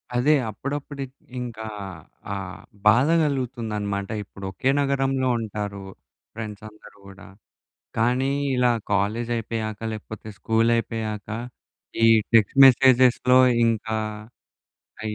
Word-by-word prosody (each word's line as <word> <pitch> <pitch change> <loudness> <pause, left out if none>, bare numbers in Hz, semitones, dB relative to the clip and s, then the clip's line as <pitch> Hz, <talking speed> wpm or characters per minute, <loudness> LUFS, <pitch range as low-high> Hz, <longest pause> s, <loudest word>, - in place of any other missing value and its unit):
అదే. 140 +5 +4 0.2
అప్పుడప్పుడిట్ 140 +3 -6 0.3
ఇంకా 115 -3 -6 0.7
ఆహ్, 95 -1 -6 0.3
బాధ 120 +6 +5
గలుగుతుందనమాట. 115 -8 -2
ఇప్పుడు 100 -1 -11
ఒకే 130 +8 -1
నగరంలో 135 -1 0
ఉంటారు. 105 -2 -5 0.5
ఫ్రెండ్సందరు 105 -1 -9
గూడా, 100 0 -13 0.7
కానీ 125 +4 +1 0.3
ఇలా 125 -1 +3 0.2
కాలేజయిపోయాక 110 +1 -1
లేకపోతే, 110 0 -8
స్కూలయిపోయాక, 115 -2 0 0.7
ఈ - - +6 0.3
టెక్స్ట్ 115 +4 +3
మెసేజెస్‌లో 130 -1 +5 0.3
ఇంకా 110 -1 0 1.1
ఆహ్, 110 - -4
115 Hz, 85 wpm, -24 LUFS, 105-130 Hz, 1.1 s, ఈ